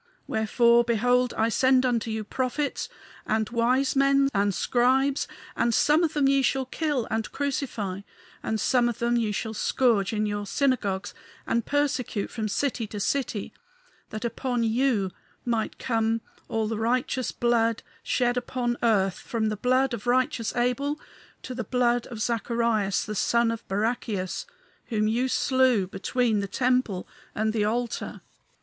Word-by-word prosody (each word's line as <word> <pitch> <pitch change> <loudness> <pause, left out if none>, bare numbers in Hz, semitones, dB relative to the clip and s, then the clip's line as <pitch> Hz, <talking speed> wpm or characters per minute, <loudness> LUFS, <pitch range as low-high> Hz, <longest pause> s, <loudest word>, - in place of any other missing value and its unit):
Wherefore, 235 +2 +3
behold, 245 +2 +2
I 225 +1 +2
send 260 +2 +3
unto 235 -3 0
you 220 0 -2
prophets 260 +6 -2 0.4
and 220 0 +1
wise 250 +4 +2
men 275 0 +4
and 200 0 +2
scribes; 260 +8 +2 0.3
and 235 -1 +1
some 305 +3 +4
of 320 - 0
them 290 -2 +2
ye 275 0 +4
shall 265 0 +1
kill 285 -2 -1
and 220 0 -2
crucify, 240 -9 -3 0.4
and 220 - -2
some 245 0 +3
of 235 - -4
them 235 0 +1
ye 225 -3 +1
shall 220 +2 -3
scourge 225 -2 +2
in 215 -1 0
your 205 -1 -3
synagogues 215 -8 0 0.3
and 230 -1 0
persecute 285 -7 -1
from 220 -2 -3
city 235 +1 -1
to 205 0 -6
city. 230 -2 -2 0.6
That 215 +2 -5
upon 245 0 -1
you 225 -4 +1 0.3
might 230 -2 -1
come 225 -1 0 0.3
all 220 -1 -1
the 220 0 -3
righteous 250 +2 0
blood 230 -1 +1 0.2
shed 245 0 +1
upon 245 -1 -2
earth, 195 -5 +2
from 220 -2 -2
the 215 - -2
blood 255 +4 +2
of 235 +1 -5
righteous 250 -2 +1
Abel 250 +5 0 0.4
to 255 - -6
the 245 0 -3
blood 245 +1 +1
of 225 -2 -7
Zacharias, 230 -4 0
the 215 - -4
son 235 +3 +2
of 230 0 -6
Barachias, 205 - -2 0.4
whom 215 -3 0
ye 240 +4 +1
slew 260 -6 +2
between 215 +4 0
the 200 - -2
temple 245 -3 0 0.3
and 215 +1 0
the 210 -2 +1
altar. 235 +2 -2
235 Hz, 155 wpm, -26 LUFS, 220-255 Hz, 0.6 s, men